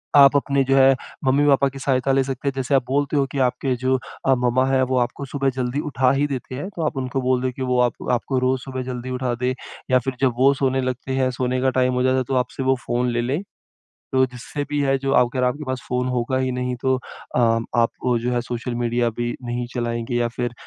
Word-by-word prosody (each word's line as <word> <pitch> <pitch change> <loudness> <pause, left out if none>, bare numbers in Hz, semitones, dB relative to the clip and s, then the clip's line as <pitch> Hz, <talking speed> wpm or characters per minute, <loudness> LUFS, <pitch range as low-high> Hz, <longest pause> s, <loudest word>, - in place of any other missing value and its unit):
आप 140 0 +8
अपने 140 -1 +2
जो 135 - +5
है, 135 0 +6 0.3
मम्मी-पापा 140 +1 +4
की 135 0 -10
सहायता 135 -1 +1
ले 135 0 +3
सकते 135 +1 -5
हैं। 140 - +1
जैसे 135 0 -2
आप 135 - +3
बोलते 145 +2 0
हो 140 - +3
कि 140 - -3
आपके 125 +1 +1
जो 130 0 +3 0.3
अ, 135 - +5
मम्मा 125 +1 +2
हैं, 135 -1 +2
वो 130 0 0
आपको 125 +3 -2
सुबह 135 0 -1
जल्दी 125 +2 -1
उठा 130 -2 +2
ही 140 +1 +2
देते 130 -2 -5
हैं 145 +8 -4
तो 170 - -4
आप 150 - -2
उनको 130 0 -2
बोल 125 0 +1
दें 130 0 0
कि 130 - -9
वो 125 -1 +1
आप 120 -1 +2 0.2
आपको 125 +2 0
रोज़ 130 0 +1
सुबह 130 0 -5
जल्दी 125 0 -5
उठा 125 -1 -1
दें। 130 +1 +2 0.4
या 130 - +6
फिर 130 +1 -4
जब 130 -3 +3
वो 135 +2 +5
सोने 135 -1 0
लगते 130 +1 -3
हैं, 130 -1 +2
सोने 125 0 -1
का 130 - +3
टाइम 130 0 +2
हो 125 0 +1
जाता 130 0 +3
है, 130 - +1
तो 130 +2 -2
आपसे 125 +1 -1
वो 130 0 +3
फ़ोन 120 +1 0
ले 120 0 0
लें। 135 +8 -1 0.7
तो 130 0 +4
जिससे 125 +3 -6
भी 145 -1 0
है 135 0 +2
जो 135 0 -2
अगर 125 +1 0
आपके 125 +4 0
पास 130 -1 -2
फ़ोन 125 0 0
होगा 120 +2 0
ही 130 0 0
नहीं, 125 0 -2
तो 130 0 +2
अ, 125 0 -6
आप, 115 0 +2 0.3
जो 125 +1 -1
है, 120 - +1
सोशल 120 0 -3
मीडिया 120 0 +1
भी 120 0 -1
नहीं 120 0 -3
चलाएँगे। 120 0 -2
या 120 0 +2
फिर 120 -1 -1
130 Hz, 245 wpm, -22 LUFS, 125-135 Hz, 0.7 s, आप